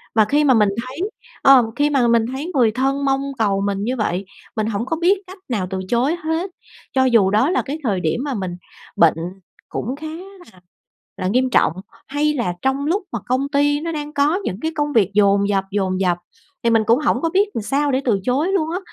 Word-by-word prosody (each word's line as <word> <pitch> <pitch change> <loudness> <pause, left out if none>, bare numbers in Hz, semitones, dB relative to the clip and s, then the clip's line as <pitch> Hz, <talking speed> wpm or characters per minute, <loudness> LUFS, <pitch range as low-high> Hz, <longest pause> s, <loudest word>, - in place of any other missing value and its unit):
Và 220 -2 +5
khi 290 +7 +2
mà 275 -3 +5
mình 210 -4 +4 0.2
thấy 260 +2 -9 0.4
ờm, 270 -3 +7
khi 290 +3 +2
mà 270 -5 +2
mình 230 -1 +3
thấy 295 +7 -4
người 240 -5 +4
thân 270 +4 0
mong 270 0 +1 0.2
cầu 200 -3 +1
mình 200 0 -1
như 250 +4 -1
vậy, 195 -3 -1 0.3
mình 215 -1 -1
hổng 225 +1 -2
có 320 +5 -2
biết 375 +4 +4
cách 375 +2 -11
nào 205 -7 -1
từ 190 -1 -3
chối 255 +7 +2
hết, 325 +4 -2 0.4
cho 260 -1 +3
dù 230 -7 +4
đó 220 +8 +3
là 370 - +1
cái 290 +3 -4
thời 205 -7 0
điểm 165 +8 -1
mà 285 -2 -2
mình 185 -5 -4 0.4
bệnh 165 -2 +5 0.5
cũng 250 +5 -3
khá 310 +2 -7
là 355 - -11 0.6
là 185 -1 -2
nghiêm 255 +4 +1
trọng, 225 - +3 0.4
hay 295 +2 0
là 235 -10 -1
trong 270 +2 0
lúc 370 +7 0
mà 235 - -1
công 260 +3 0
ty 290 0 +2
nó 330 +1 -3
đang 295 -1 -5
có 290 +3 +2
những 190 - -4
cái 320 - -1
công 295 -1 -1
việc 205 -4 +3
dồn 200 -1 +3
dập, 195 -1 +1
dồn 190 -2 0
dập 180 -2 +1 0.5
thì 235 - +3
mình 225 -1 +4
cũng 230 +3 +4
hổng 270 -4 +1
có 330 - +1
biết 400 +4 +2
làm 225 - -2
sao 280 +5 0
để 260 - +1
từ 215 -6 +1
chối 285 - +1
luôn 325 -5 0
á. 360 - -1
260 Hz, 230 wpm, -20 LUFS, 210-295 Hz, 0.6 s, ờm